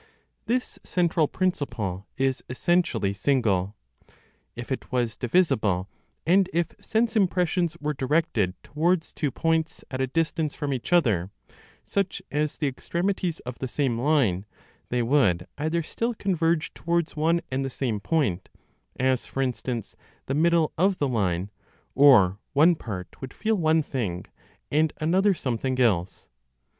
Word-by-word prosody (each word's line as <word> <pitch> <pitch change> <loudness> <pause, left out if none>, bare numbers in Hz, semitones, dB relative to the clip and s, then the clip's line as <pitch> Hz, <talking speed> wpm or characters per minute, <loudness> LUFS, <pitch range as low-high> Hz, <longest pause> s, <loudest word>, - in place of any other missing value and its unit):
This 250 +2 -1
central 170 -3 +1
principle 120 - -2
is 135 -1 0
essentially 165 - +1
single. 105 -4 +1 0.8
If 120 +3 -7
it 130 - -4
was 120 -4 0
divisible, 110 - +1 0.3
and 185 +2 +4
if 170 -2 0
sense 225 +1 +1
impressions 180 -4 +1
were 150 0 -1
directed 130 - 0
towards 160 +2 0
two 150 - -1
points 160 +3 -1
at 130 0 -2
a 130 - +1
distance 160 +1 -1
from 145 -2 -2
each 130 +4 -5
other, 110 - +3 0.5
such 195 -2 -1
as 150 +1 -1
the 155 - -1
extremities 175 +5 -2
of 125 0 -8
the 130 - -2
same 125 -3 -1
line, 120 - +2 0.4
they 125 -1 +1
would 115 -10 +2
either 160 +3 0
still 230 +8 -2
converge 170 -5 0
towards 170 -1 -1
one 165 +3 +2
and 135 +1 0
the 135 - -2
same 125 -5 -2
point, 105 - 0 0.5
as, 130 -1 +1
for 135 - -1
instance, 125 -3 -3 0.3
the 135 - -2
middle 165 +1 +3
(of 190 +1 +3
the 145 - +1
line), 100 -5 -1 0.4
or 110 -9 +6
one 155 +5 +6
part 100 - -7
would 130 - -7
feel 220 +1 0
one 160 -3 +2
thing, 100 -11 -3 0.5
and 155 +1 +2
another 190 +5 +3
something 130 -1 -2
else. 95 -7 +1
145 Hz, 140 wpm, -26 LUFS, 120-170 Hz, 0.8 s, or